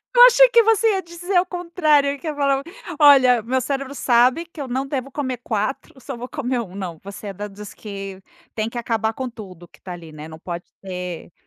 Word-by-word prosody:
Eu 485 - +10
achei - - +7
que 470 -1 +6
você 450 +1 +3
ia 385 -2 0
dizer 345 +3 -5
ao 355 - +4
contrário, 315 -6 +1
que 330 - -8
ia 305 - -2
falar: 275 -1 +1 0.4
"Olha, 260 -5 +7
meu 255 +4 0
cérebro 275 +1 -3
sabe 250 +6 +3
que 335 -3 -10
eu 275 - -4
não 260 +2 -2
devo 275 -1 -4
comer 260 -3 -3
4, 225 +5 -3
só 270 +1 -7
vou 240 +1 -7
comer 260 -4 -2
1". 190 -5 -9
Não, 180 -5 -6
você 200 +2 -8
é 200 - -5
da 205 +2 -6
dos 205 0 -10
que 195 -2 -8 0.3
tem 220 0 -1
que 240 - -8
acabar 225 -2 -1
com 260 +2 -4
tudo 185 -7 -11
que - - -23
tá 180 - -7
ali, 170 -2 -10
né, 155 0 -9
não 160 0 -11
pode 175 0 -6 0.2
ter 180 -3 -6
250 Hz, 225 wpm, -22 LUFS, 200-290 Hz, 0.4 s, Eu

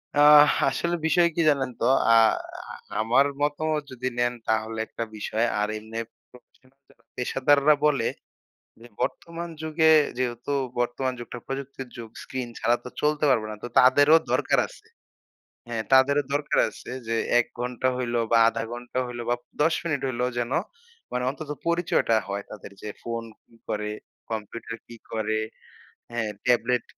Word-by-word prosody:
অ্যা 145 - +5 0.5
আসলে 170 +6 -1
বিষয় 175 +1 +4
কি 170 - +2
জানেন 135 -3 +1
তো? - - +2 0.3
আ - - +7 0.6
আ - - -7 0.3
আমার 120 +5 +4 0.2
মতামত 150 +1 0
যদি 130 0 -4
নেন, 120 0 +2 0.2
তাহলে 110 0 0
১ - - -32
টা 115 - 0
বিষয়। 110 +2 0
আর 105 - +1
এমনি 110 +1 -9 0.3
প্রফেশনাল 130 +1 -22
যারা - - -22 0.2
পেশাদাররা 140 +4 +3
বলে 140 -6 +2 0.7
যে, 120 - -12
বর্তমান 170 0 -3
যুগে 160 0 +3 0.3
যেহেতু 125 +2 -2 0.3
বর্তমান 120 +2 -1
যুগটা 120 +1 -7
প্রযুক্তির 135 -1 -6
যুগ, 115 -2 -8
স্ক্রিন 130 -2 -5
ছাড়া 120 +1 +2
তো - - -6
চলতে 150 0 +1
পারবে 110 -5 +2
না। 105 - -6
তো - - -3
তাদেরও 145 +5 +6 0.2
দরকার - - +2
আছে, 435 - -17 0.8
হ্যাঁ? 115 -2 -2
তাদেরও 140 +2 +5
দরকার 145 0 0
আছে - - -11 0.2
যে, 115 - 0 0.2
১ 120 - +2
ঘণ্টা 125 +1 -1
হইলো 120 -2 -1
বা 115 - +6
আধা 115 0 -2
ঘন্টা 120 +1 -5
হইলো 120 -1 -6
বা - - +4 0.3
১০ 160 +1 +3
মিনিট 155 -5 -1
হইলো, 125 -1 -1
যেন 120 +1 -2 0.6
মানে 125 - -1
অন্তত 150 +2 -8 0.2
পরিচয়টা 170 -9 +2
হয় 100 0 -3
তাদের। 105 - -9
যে, - - -5
ফোন 115 0 -3 0.2
কি - - -26
করে, 105 0 -2 0.4
কম্পিউটার 115 +1 -5
কি 120 - -11 0.2
করে, 110 -1 0 0.7
হ্যাঁ, 115 -2 -2 0.2
ট্যাবলেট, 125 0 +2
125 Hz, 160 wpm, -25 LUFS, 115-145 Hz, 0.8 s, আ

